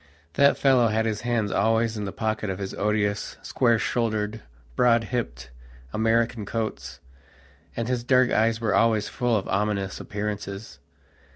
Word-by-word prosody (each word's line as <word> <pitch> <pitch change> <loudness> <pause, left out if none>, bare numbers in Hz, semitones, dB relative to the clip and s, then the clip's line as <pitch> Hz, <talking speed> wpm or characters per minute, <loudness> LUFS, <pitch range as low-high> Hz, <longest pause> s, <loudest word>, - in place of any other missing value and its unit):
That 140 +7 +4
fellow 130 -4 +4
had 110 0 +1
his 110 -1 -2
hands 115 -4 0
always 110 +3 +2
in 105 -1 -3
the 100 - -4
pockets 110 -1 -2
of 95 - -4
his 95 -1 -5
odious, 105 0 -1
square 120 -2 +2
shouldered, 110 -2 -1 0.3
broad 115 -2 +4
hipped, 65 - -4 0.4
American 115 +1 +1
coats, 110 +2 -4 0.8
and 115 -1 -2
his 125 -1 -1
dark 125 0 +3
eyes 115 +1 +2
were 110 -3 0
always 110 -2 +2
full 120 -2 0
of 100 - -4
ominous 100 -1 -1
appearances. 105 -5 -5
110 Hz, 150 wpm, -25 LUFS, 105-115 Hz, 0.8 s, That